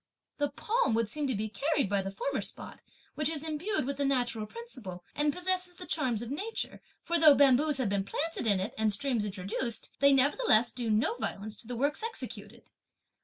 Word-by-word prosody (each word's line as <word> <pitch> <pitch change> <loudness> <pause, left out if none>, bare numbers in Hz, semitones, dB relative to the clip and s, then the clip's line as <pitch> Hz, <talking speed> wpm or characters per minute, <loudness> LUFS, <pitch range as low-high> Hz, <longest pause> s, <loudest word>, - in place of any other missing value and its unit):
The 290 0 +1
palm 460 - 0
would 230 -1 +1
seem 295 +5 -2
to 260 - 0
be 215 +2 -2
carried 280 +4 0
by 200 0 +1
the 195 - -4
former 265 +8 -2
spot, - - -8 0.3
which 305 -1 0
is 320 -1 -3
imbued 310 +1 -1
with 275 0 -3
the 285 - 0
natural 245 -5 0
principle, 215 - -9
and 295 0 +1
possesses 360 +1 -1
the 360 - -7
charms 250 -10 0
of 240 - -6
nature; 415 +10 -3 0.2
for, 340 0 +1
though 305 -3 +8
bamboos 280 +2 +4
have 255 -6 0
been 200 -1 0
planted 305 +5 -3
in 200 -3 +3
it, 190 - -3
and 220 -1 +3
streams 230 0 0
introduced, 205 +4 -3
they 280 0 +6
nevertheless 270 - +4
do 240 -2 -3
no 220 - +2
violence 210 +2 -4
to 225 - -8
the 245 - -4
works 285 - +1
executed. 235 - -6
265 Hz, 200 wpm, -30 LUFS, 220-310 Hz, 0.3 s, though